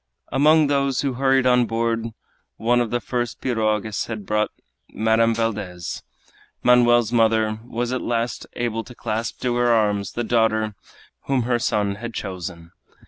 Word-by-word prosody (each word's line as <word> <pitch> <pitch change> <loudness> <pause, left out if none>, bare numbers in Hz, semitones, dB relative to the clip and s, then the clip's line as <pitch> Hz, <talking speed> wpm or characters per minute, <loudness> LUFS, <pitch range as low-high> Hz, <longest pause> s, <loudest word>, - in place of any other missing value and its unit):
Among 155 +3 +5
those 140 -2 +1
who 140 -2 -1
hurried 135 +1 +2
on 125 -1 +4
board 115 0 -1 0.5
one 120 +2 +2
of 120 - -1
the 120 - 0
first 120 -1 -3
pirogues 110 -3 -1
had 110 -3 -6
brought 105 +1 +1 0.4
Madame 115 +1 +2
Valdez. 100 -6 -3 0.6
Manoel's 120 -2 +4
mother 110 -2 +2
was 120 +1 -3
at 130 - -1
last 115 0 -2
able 115 -2 -2
to 125 - -12
clasp 110 -1 -3
to 125 -1 0
her 120 0 +2
arms 105 -4 +1
the 120 - -2
daughter 110 -2 +1 0.5
whom 135 -3 +1
her 120 0 +1
son 100 -3 0
had 115 +1 -7
chosen. 90 -3 -6
115 Hz, 150 wpm, -22 LUFS, 110-120 Hz, 0.6 s, Among